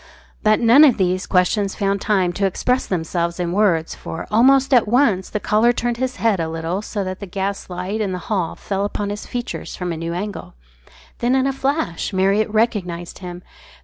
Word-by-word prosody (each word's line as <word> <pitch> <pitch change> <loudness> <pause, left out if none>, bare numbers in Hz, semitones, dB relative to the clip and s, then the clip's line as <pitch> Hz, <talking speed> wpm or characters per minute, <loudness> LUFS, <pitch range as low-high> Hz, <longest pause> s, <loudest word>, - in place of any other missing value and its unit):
But 215 0 +3
none 240 +5 +7
of 270 -6 +5
these 185 -1 0
questions 195 +2 +1
found 200 -1 0
time 190 -5 +1
to 195 +2 +1
express 250 +7 0
themselves 170 0 -2
in 175 -1 -1
words, 180 -5 +1
for 165 - -7
almost 265 +5 +4
at 240 -4 +5
once 220 -6 +2
the 210 - -2
caller 215 +4 +3
turned 240 -1 -2
his 255 +1 -2
head 225 -5 +1
a 165 -1 -1
little 165 +4 -3
so 210 -1 -4
that 185 0 -5
the 200 - -7
gas 195 +2 -3
light 185 +4 -3
in 200 -3 -1
the 180 - -2
hall 185 -6 -1
fell 195 0 -3
upon 205 0 -2
his 205 - -6
features 245 0 -5
from 180 -1 -3
a - - -5
new 165 +1 -4
angle. 200 - -6 0.6
Then 245 +2 +2
in 265 0 +2
a 270 - 0
flash 270 - -2
Marriott 195 +3 +2
recognised 200 -6 -1
him. 180 -1 -8
200 Hz, 200 wpm, -20 LUFS, 180-230 Hz, 0.6 s, none